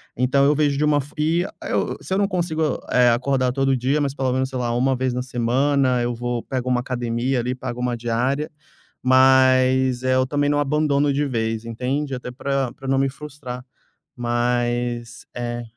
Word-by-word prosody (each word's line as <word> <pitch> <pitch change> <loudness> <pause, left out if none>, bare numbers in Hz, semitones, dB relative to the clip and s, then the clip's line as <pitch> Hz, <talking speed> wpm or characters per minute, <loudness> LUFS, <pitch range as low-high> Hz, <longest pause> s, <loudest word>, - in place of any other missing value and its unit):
Então 130 +3 +2
eu 145 +1 +4
vejo 145 -1 +1
de 150 - +2
uma 145 -1 +3
fo 140 - -13
e 160 +3 +1 0.2
eu - - -1
se - - -4
eu - - +2
não 200 - +2
consigo, 165 -5 -1
eh, 125 -1 +5
acordar 130 +1 +1
todo 135 +1 +1
dia, 130 +4 0
mas 140 -2 -1
pelo 130 -2 0
menos, 130 0 0
sei 130 -1 -4
lá, 120 -1 -1
1 130 +2 +2
vez 130 0 -1
na 125 0 -2
semana 130 +2 +1
eu 120 0 -1
vou 120 0 -3
pego 130 -2 -3
uma 125 -1 +2
academia 125 +1 -1
ali, 125 +2 -2
pago 125 -1 -6
uma 125 -1 -1
diária, 125 +6 -1 0.5
mas, 130 -1 +4
eh, 130 0 +2
eu 130 0 +2
também 145 +1 0
não 145 - +1
abandono 145 0 +1
de 145 +2 0
vez, 115 -3 -2
entende? 130 +5 -2
Até 125 0 -6
pra 135 0 -2
pra 135 - -10
não 135 0 +2
me 135 0 +2
frustrar. 130 -3 -8 0.5
Mas 120 0 -1
É. 120 0 -4
130 Hz, 195 wpm, -22 LUFS, 120-140 Hz, 0.5 s, eh